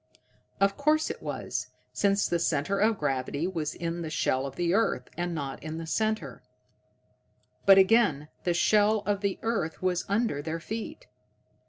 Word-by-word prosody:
_ -, -, -47 dB, 0.6 s
Of 195 Hz, 0 st, +2 dB
course 305 Hz, +2 st, +2 dB
it -, -, -9 dB
was, -, -, -4 dB, 0.3 s
since 200 Hz, 0 st, +2 dB
the 170 Hz, -, 0 dB
center 165 Hz, +4 st, 0 dB
of 215 Hz, +1 st, +3 dB
gravity 140 Hz, +1 st, -1 dB
was 165 Hz, -5 st, -3 dB
in 170 Hz, 0 st, -3 dB
the 160 Hz, -, -4 dB
shell 135 Hz, -3 st, 0 dB
of 135 Hz, -, -9 dB
the 175 Hz, 0 st, 0 dB
earth, 200 Hz, -, +1 dB
and 175 Hz, 0 st, -2 dB
not 140 Hz, -3 st, -5 dB
in 155 Hz, +2 st, -5 dB
the 165 Hz, -, -5 dB
center! 220 Hz, +6 st, -1 dB, 1.3 s
But, 195 Hz, 0 st, +9 dB
again, 190 Hz, -7 st, +4 dB, 0.2 s
the 175 Hz, -1 st, +1 dB
shell 210 Hz, +3 st, +3 dB
of 200 Hz, -1 st, 0 dB
the 200 Hz, -2 st, -1 dB
earth 200 Hz, -8 st, -2 dB
was 180 Hz, -1 st, 0 dB
under 200 Hz, -8 st, 0 dB
their 160 Hz, +2 st, -4 dB
feet! 220 Hz, -, -6 dB
180 Hz, 170 wpm, -28 LUFS, 160-210 Hz, 1.3 s, But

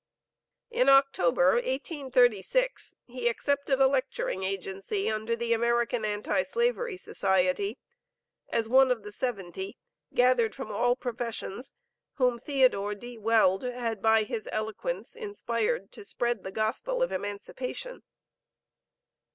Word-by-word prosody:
In 485 Hz, +1 st, +3 dB
October, 270 Hz, -10 st, +5 dB
1836, 265 Hz, -, 0 dB
he 245 Hz, -1 st, -3 dB
accepted 280 Hz, +2 st, 0 dB
a 270 Hz, -, +6 dB
lecturing 260 Hz, -7 st, 0 dB
agency 195 Hz, -, -2 dB
under 220 Hz, +2 st, -1 dB
the 235 Hz, 0 st, 0 dB
American 235 Hz, 0 st, +1 dB
Anti 210 Hz, +6 st, 0 dB
slavery 475 Hz, -, -1 dB
Society, 190 Hz, -, 0 dB, 0.7 s
as 225 Hz, -1 st, 0 dB
one 260 Hz, +2 st, +6 dB
of 240 Hz, -4 st, 0 dB
the 210 Hz, -, -8 dB
"seventy," 195 Hz, -5 st, -4 dB, 0.3 s
gathered 245 Hz, -2 st, +3 dB
from 265 Hz, -, -6 dB
all 245 Hz, 0 st, +2 dB
professions, 245 Hz, 0 st, -4 dB, 0.4 s
whom 250 Hz, -3 st, +1 dB
Theodore 250 Hz, -7 st, +2 dB
D. 240 Hz, +2 st, -10 dB
Weld 215 Hz, -4 st, +3 dB
had 240 Hz, -4 st, -3 dB
by 220 Hz, 0 st, +4 dB
his 225 Hz, -1 st, -5 dB
eloquence 220 Hz, -, -3 dB
inspired 425 Hz, -, -2 dB
to 430 Hz, -, -10 dB
spread 240 Hz, -, -2 dB
the 190 Hz, -, -6 dB
gospel 245 Hz, -, -1 dB
of -, -, -1 dB
emancipation. 350 Hz, -, -5 dB
240 Hz, 120 wpm, -28 LUFS, 215-275 Hz, 0.7 s, a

